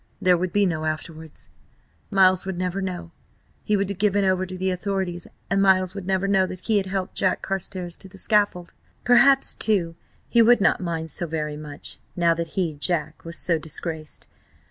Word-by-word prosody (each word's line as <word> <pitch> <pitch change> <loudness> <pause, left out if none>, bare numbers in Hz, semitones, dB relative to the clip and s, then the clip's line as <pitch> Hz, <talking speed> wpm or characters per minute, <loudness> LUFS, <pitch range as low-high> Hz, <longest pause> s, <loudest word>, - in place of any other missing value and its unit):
There 180 -1 +4
would 180 +1 -2
be 205 +2 +3
no 160 -4 -1
"afterwards."... 155 0 -6 0.6
Miles 185 -1 +4
would 190 -2 -4
never 185 +2 -2
know... 175 -3 -5 0.5
He 210 - +1
would 200 0 0
be - - -1
given 200 0 +1
over 185 0 +1
to 185 0 -6
the 190 +1 0
authorities, 180 -2 -3 0.2
and 195 +2 +1
Miles 185 -1 +3
would 195 -3 -7
never 190 0 +1
know 190 -1 +3
that 185 0 -8
he 220 +1 +1
had 195 -1 0
helped 190 -1 -3
Jack 185 -1 0
Carstares 185 -2 -3
to 195 - -7
the 195 - -14
scaffold.... 205 -4 +1 0.3
Perhaps, 265 +3 +5
too, 185 -7 +1 0.3
he 235 - +4
would 240 +1 +6
not 195 - +2
mind 165 -2 -3
so 170 - -3
very 150 -2 -3
much, 150 -1 -8 0.2
now 170 -2 +3
that 165 0 -3
he, 175 -4 0
Jack, 155 0 -2
was 165 0 -7
so 170 -2 0
disgraced. 155 0 -5
185 Hz, 190 wpm, -24 LUFS, 170-195 Hz, 0.6 s, would